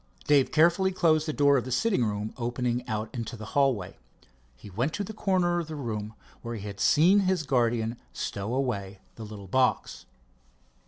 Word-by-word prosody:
Dave 145 -3 +3
carefully 170 +4 +4
closed 160 -3 +2
the - - 0
door 140 -1 +4
of 125 - 0
the 130 - -7
sitting 195 - +1
room 105 0 -3
opening 120 0 -2
out 110 -1 -3
into 120 -1 -5
the 110 - -8
hallway. 130 -10 +1 0.6
He 85 - -14
went 125 - -1
to 205 - -2
the 220 - -7
corner 180 -4 +1
of 165 - -4
the 160 - -6
room 110 -6 -5 0.3
where 115 0 -5
he 105 -2 -7
had 100 -1 -7
seen 165 - +5
his 185 -4 +1
guardian 120 -4 0
stow 105 +5 -4
away 100 -8 -2 0.2
the 115 - -9
little 105 -2 -9
box. 130 +7 0
125 Hz, 180 wpm, -27 LUFS, 110-155 Hz, 0.6 s, seen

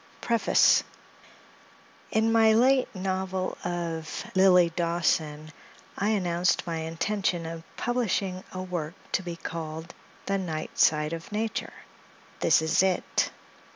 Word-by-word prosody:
IN 220 +1 +2
my 225 -1 +5
late 255 +3 +4
novel 190 0 -2
of 170 -2 -4
"Lilly 180 -3 +5
Dawson," 160 -3 0 0.4
I 205 - 0
announced 180 -4 +1
my 165 -1 -3
intention 170 +2 -1
of 165 0 -6 0.2
publishing 200 -6 -1
a 185 0 -5
work 175 -2 -4 0.2
to - - +1
be 175 -2 -6
called 160 -1 -6 0.3
"The 195 0 0
Night 160 -4 -5
Side 150 +1 +3
of 165 +3 -7
Nature;" 220 +1 -3 0.7
this - - +4
is 160 - +3
it. 190 -1 +1
180 Hz, 115 wpm, -27 LUFS, 165-195 Hz, 0.7 s, my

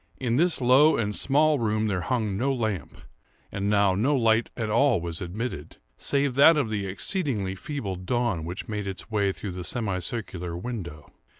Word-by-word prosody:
In 125 -2 -1
this 175 +3 +2
low 130 +5 +5
and 105 -2 -1
small 150 +1 +3
room 110 -1 0
there 95 -4 -1
hung 110 0 -1
no 130 +7 0
lamp; 110 - -3 0.5
and 100 0 -2
now 100 -2 +3
no 125 +10 +1
light 115 -2 +2
at 115 -3 -2
all 115 0 +3
was 85 -1 -5
admitted, 90 - -5 0.2
save 140 -1 0
that 150 +5 +6
of 125 -7 0
the 100 -2 -2
exceedingly 105 - -1
feeble 100 - -5
dawn 100 -2 -1
which 90 +4 -6
made 105 -2 -4
its 95 +4 -7
way 100 -2 +1
through 95 0 -6
the 90 0 -6
semi 100 -3 -2
circular 90 -3 -5
window. 85 - -7
110 Hz, 180 wpm, -26 LUFS, 95-125 Hz, 0.5 s, that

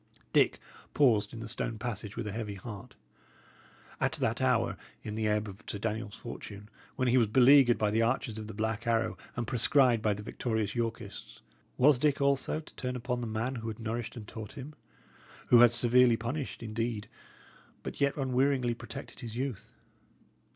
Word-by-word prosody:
Dick - - +4 0.4
paused 110 -8 +4
in 115 - -8
the 115 - -6
stone 115 0 -2
passage 110 -3 -5
with 120 - -3
a 105 - -3
heavy 105 -1 -4
heart. 100 0 -9 1.0
At - - +1
that - - -1
hour, - - +2 0.3
in 105 - -5
the 110 0 -1
ebb 105 0 +1
of 100 +1 -10
Sir - - -3
Daniel's 105 0 -3
fortune, 105 -3 -8 0.3
when 130 - 0
he 125 +1 +5
was 115 - +3
beleaguered 130 +2 +6
by 105 -1 +1
the 110 +2 +2
archers 115 -1 0
of 110 - -7
the 110 - -8
Black 110 +1 -2
Arrow 115 -1 +1 0.2
and 120 - -2
proscribed 125 0 +3
by 105 -1 +1
the 105 - -8
victorious 110 -2 -2
Yorkists, 115 -2 -5 0.4
was 135 0 +5
Dick, 150 +1 +2
also, 140 +2 +1
to 155 - -13
turn 125 0 -3
upon 125 0 -2
the 120 - -3
man 110 +4 -2
who 115 0 -5
had 110 -1 -4
nourished 115 +1 -4
and 105 -3 -8
taught 110 +2 -8
him, 145 +1 -8 0.8
who 120 - +8
had 120 -1 +8
severely 120 0 +4
punished, 125 +3 -4
indeed, 115 -1 -3 0.8
but - - -6
yet 140 +1 +2
unwearyingly 130 -2 +1
protected 120 +4 -9
his 115 -4 -7
youth? 130 -5 -4
115 Hz, 180 wpm, -30 LUFS, 110-125 Hz, 1.0 s, who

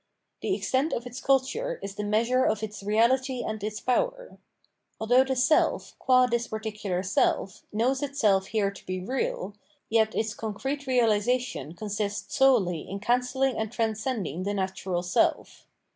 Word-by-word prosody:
The - - 0
extent* 270 +5 0
of 235 - -3
its 245 +2 -7
culture 275 - +1
is 195 - -5
the 210 +1 -4
measure 230 +5 +2
of 215 0 0
its 210 -1 -5
reahty 240 +5 +1
and 215 -1 -4
its 215 0 -3
power. - - -1 0.6
Although 245 +4 +4
the 265 0 -2
self, 260 +5 +2
qua 255 -1 +5
this 235 -1 -1
particular 210 -4 -3
self, 190 0 0
knows 250 +6 +1
itself 215 -10 +1
here 210 -3 0
to 200 - -14
be 185 0 -2
real, 205 -2 -2 0.4
yet 220 -1 +3
its 220 -1 -1
concrete 265 +7 -4
reahsation 230 - +1
consists 205 0 -3
solely 210 - +3
in 195 - -4
cancelling 250 +3 +1
and 220 -1 -2
transcending 220 - -2
the 200 +2 -2
natural 190 -2 -2
self. 180 - 0
220 Hz, 150 wpm, -27 LUFS, 205-255 Hz, 0.6 s, qua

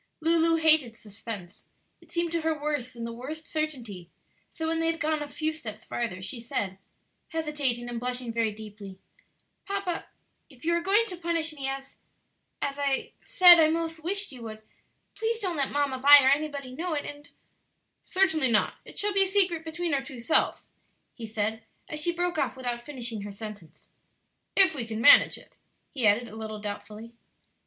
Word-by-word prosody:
Lulu 330 0 +3
hated 310 -8 +3
suspense; 205 -3 -9 0.4
it - - -20
seemed 340 -1 -1
to 335 -1 -1
her 315 -1 -1
worse 290 -4 -3
than 235 -1 -8
the 230 0 -5
worst 295 +7 -7
certainty; 240 - -4 0.4
so 320 - -5
when 325 0 0
they 330 - +1
had 330 0 -1
gone 310 0 0
a 295 - -4
few 310 +2 -2
steps 220 -8 -8
farther 190 -6 -4
she 235 +4 -5
said, 195 -5 -3 0.5
hesitating 295 -7 -1
and 240 -1 -4
blushing 245 -1 -3
very 225 -1 +1
deeply, 205 -2 -10 0.7
"Papa, 395 -3 -3 0.4
if 265 +1 -15
you 340 - +2
are 340 - +1
going 400 +6 +3
to 385 -5 -6
punish 335 -2 -1
me 275 -3 -3
as 270 0 -6 0.6
as 280 0 -3
I 275 -1 -1
said 360 -8 +8
I 310 -1 +5
'most 325 0 -2
wished 400 +1 -2
you 255 -3 -11
would, 220 -1 -8 0.5
please 450 0 -2
don't 370 -6 -2
let 275 -2 0
Mamma 285 -2 0
Vi 285 +1 +9
or - - +6
anybody 285 -2 -1
know 330 +6 -3
it, 290 - -3
and 290 0 -9 0.4
" - - -48 0.2
"Certainly 320 -8 +2
not; 215 -2 +2
it - - -13
shall 415 0 +1
be 395 - +4
a - - -3
secret 370 -4 +2
between 325 0 -3
our 275 - +1
two 270 -1 -10
selves," 240 +7 +1 0.5
he 230 -2 -8
said 220 0 -2 0.3
as 305 - -4
she 345 - +2
broke 350 -1 -1
off - - -1
without 245 -2 -3
finishing 240 -5 -5
her 205 0 -7
sentence; 205 -4 -10 0.7
"if 385 -3 +7
we 270 -6 -3
can 225 -1 -5
manage 235 - +7
it," - - -19 0.4
he 255 -7 +2
added 220 +4 +3
a 215 - -11
little 220 -1 -6
doubtfully. 210 +2 -7
280 Hz, 190 wpm, -27 LUFS, 230-325 Hz, 0.7 s, Vi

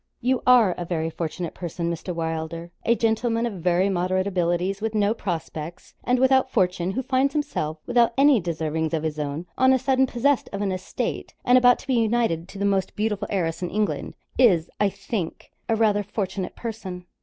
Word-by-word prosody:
'You 255 +1 +1
are 240 -6 +6
a - - -2
very 165 -2 -2
fortunate 165 +1 -4
person, 170 -1 -3
Mr. 170 +2 -5
Wylder; 165 0 -4
a 235 - +3
gentleman 230 +1 +1
of 200 -7 -4
very 180 +2 +2
moderate 185 0 0
abilities, 180 +1 0
with 220 0 -2
no 210 0 +3
prospects, 170 -5 -5
and 250 0 +2
without 265 0 +4
fortune, 180 -6 +1
who 260 - -2
finds 265 +2 +1
himself, 160 - -2
without 240 -1 +3
any 275 -2 +6
deservings 160 -2 -2
of 160 - -2
his 155 -1 -3
own, 150 +3 -3
on 260 0 +6
a - - +4
sudden, 265 +1 +2
possessed 255 +3 +1
of 200 0 -3
an 195 - 0
estate, 185 0 -4
and 245 - +5
about 245 -1 +6
to - - -13
be 265 - +1
united 225 -7 +1
to - - -10
the 200 - -1
most 195 -2 0
beautiful 210 -1 -1
heiress 170 -5 -1
in 180 - -2
England, 210 +1 -2 0.2
is, 180 -10 +4
I 205 - +3
think, 200 -3 -5 0.2
rather 220 -2 +3
a - - -2
fortunate 190 -2 -4
person.' 190 -6 -6
195 Hz, 190 wpm, -24 LUFS, 170-235 Hz, 0.2 s, are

